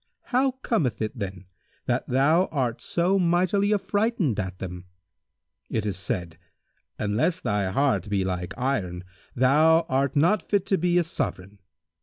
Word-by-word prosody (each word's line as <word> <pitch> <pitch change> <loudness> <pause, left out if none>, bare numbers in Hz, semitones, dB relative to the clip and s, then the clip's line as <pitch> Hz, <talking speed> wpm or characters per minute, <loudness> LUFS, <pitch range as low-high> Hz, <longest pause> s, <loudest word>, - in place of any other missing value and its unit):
How 260 +1 +3
cometh 150 - 0
it 110 +3 -4
then, 95 -2 -5 0.4
that - - -1
thou 155 +8 +3
art 125 -6 -2
so 180 +3 +1
mightily 185 +3 +2
affrighted 205 - 0
at 95 -2 -4
them? 90 -1 -7 0.8
It 110 -2 -2
is 100 -3 -1
said, 85 -2 -4 0.6
'Unless 115 - 0
thy 105 -4 0
heart 130 0 +1
be 100 -2 0
like 90 -1 -3
iron, 100 -10 -2 0.3
thou 155 +6 +5
art 135 +2 0
not 175 +8 +3
fit 200 -2 +1
to 195 -1 +1
be 175 +1 +2
a 175 - +4
Sovran.' 100 - -4
135 Hz, 145 wpm, -25 LUFS, -, 0.8 s, thou